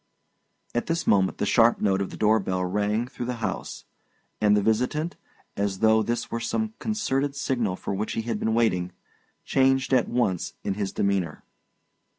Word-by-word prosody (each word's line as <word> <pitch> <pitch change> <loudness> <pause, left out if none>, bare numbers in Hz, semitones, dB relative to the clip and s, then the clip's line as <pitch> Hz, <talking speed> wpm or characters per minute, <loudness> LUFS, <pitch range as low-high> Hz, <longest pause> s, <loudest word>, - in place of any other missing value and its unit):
At 120 - -1
this 165 0 -1
moment, 95 -2 +3
the - - 0
sharp 115 +2 +4
note 100 -2 +1
of 95 - -2
the - - -9
door 110 +1 +4
bell 95 -2 -1
rang 105 +4 0
through 120 -1 -6
the 125 - -2
house; 115 - -4 0.6
and 105 -1 +5
the - - +3
visitant, 125 - 0 0.4
as 100 -1 -1
though 110 +1 +4
this 120 +1 -2
were 115 - -1
some 220 - -2
concerted 145 -10 -1
signal 120 -8 -1
for 100 - -4
which 105 +3 -2
he 115 - -2
had 115 -2 -2
been 110 0 0
waiting, 90 -6 +1 0.5
changed 135 0 +2
at 125 -3 +3
once 120 -8 0
in - - -1
his 100 -1 -3
demeanour. 95 -6 -1
110 Hz, 175 wpm, -26 LUFS, 100-125 Hz, 0.6 s, and